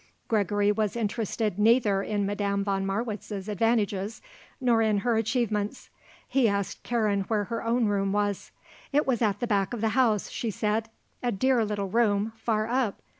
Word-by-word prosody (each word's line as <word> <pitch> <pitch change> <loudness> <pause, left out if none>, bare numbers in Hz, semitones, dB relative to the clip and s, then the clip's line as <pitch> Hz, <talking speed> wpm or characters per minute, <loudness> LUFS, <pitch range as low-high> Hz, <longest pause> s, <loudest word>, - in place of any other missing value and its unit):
Gregory 205 -1 +2
was 210 0 -1
interested 215 -2 -2
neither 215 -3 +4
in 205 0 -1
Madame 200 0 -1
von 195 -1 -1
Marwitz's 205 -1 -3
advantages 210 -1 0 0.4
nor 240 -4 +3
in 215 -2 +2
her 240 -2 +3
achievements. 220 -2 -1 0.4
He 260 -5 +3
asked 200 -1 -2
Karen 215 -4 0
where 215 -2 +1
her 230 +4 -4
own 230 +1 +2
room 200 -2 +1
was. 205 -1 -1 0.4
It 295 +1 +2
was 250 -4 0
at 205 -3 +1
the - - -1
back 205 -1 0
of 225 - -6
the 220 - +2
house, 225 -3 +2
she 230 - -3
said; 215 +2 -1 0.3
a 245 - 0
dear 250 +3 +2
little 205 -2 -2
room, 215 0 +1
far 220 -1 0
up. 240 -3 0
215 Hz, 170 wpm, -27 LUFS, 205-230 Hz, 0.4 s, neither